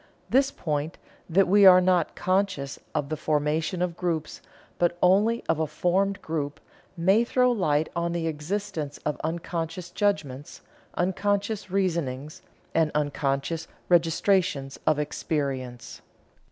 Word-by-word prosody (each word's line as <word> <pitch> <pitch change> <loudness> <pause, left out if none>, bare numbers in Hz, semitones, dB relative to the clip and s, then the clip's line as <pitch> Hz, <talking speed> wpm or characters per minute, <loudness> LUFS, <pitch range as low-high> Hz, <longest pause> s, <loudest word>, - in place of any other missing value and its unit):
This 270 +1 +4
point, 155 - -3 0.3
that 190 +4 +4
we 200 +2 +5
are 185 -1 +9
not 180 -2 +2
conscious 185 -7 -1 0.2
of 145 -2 -1
the 155 - -1
formation 155 +4 0
of 175 -2 -2
groups, 170 -3 -3 0.4
but 175 0 +2
only 205 +6 +3
of 160 - +1
a 160 - 0
formed 185 +5 0
group, 150 -2 -3 0.4
may 190 +7 +4
throw 250 +1 +2
light 155 -9 +1
on 170 0 -1
the 170 -1 -2
existence 155 -1 -3
of 150 - -2
unconscious 165 +1 -4
judgments, 150 -10 -2 0.3
unconscious 200 +3 -1
reasonings, 160 -7 -2 0.3
and 160 -1 +3
unconscious 145 +2 -1 0.2
registrations 165 -4 +2
of 155 - +4
experience." 140 -4 -3
165 Hz, 125 wpm, -26 LUFS, 150-190 Hz, 0.4 s, are